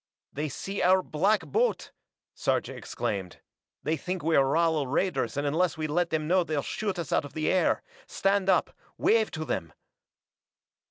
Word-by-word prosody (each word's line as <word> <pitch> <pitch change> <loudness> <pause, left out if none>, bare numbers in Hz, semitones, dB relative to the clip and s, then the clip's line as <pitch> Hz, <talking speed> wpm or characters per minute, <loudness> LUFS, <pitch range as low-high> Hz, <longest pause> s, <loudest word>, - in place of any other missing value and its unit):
"They 150 +2 -2
see 195 +9 -4
our 185 +1 +4
black 195 +8 +2
boat!" 475 +2 0 0.4
Sarja - - -1
exclaimed. 95 -4 -4 0.5
"They 155 +2 +1
think 180 0 -4
we're 160 -3 +4
Rala 150 0 +1
raiders 180 -2 0
and 145 - 0
unless 160 +4 +1
we 155 - -2
let 170 +3 0
them 155 -1 -1
know 180 +2 +3
they'll 155 -4 -2
shoot 205 -3 -3
us 170 -5 -3
out - - +3
of 145 - -10
the 155 -1 0
air! 185 - +2 0.2
Stand 195 0 +1
up - - +2 0.2
wave 220 -1 +3
to 155 -1 -5
them 85 - -3
165 Hz, 165 wpm, -28 LUFS, 150-190 Hz, 0.5 s, our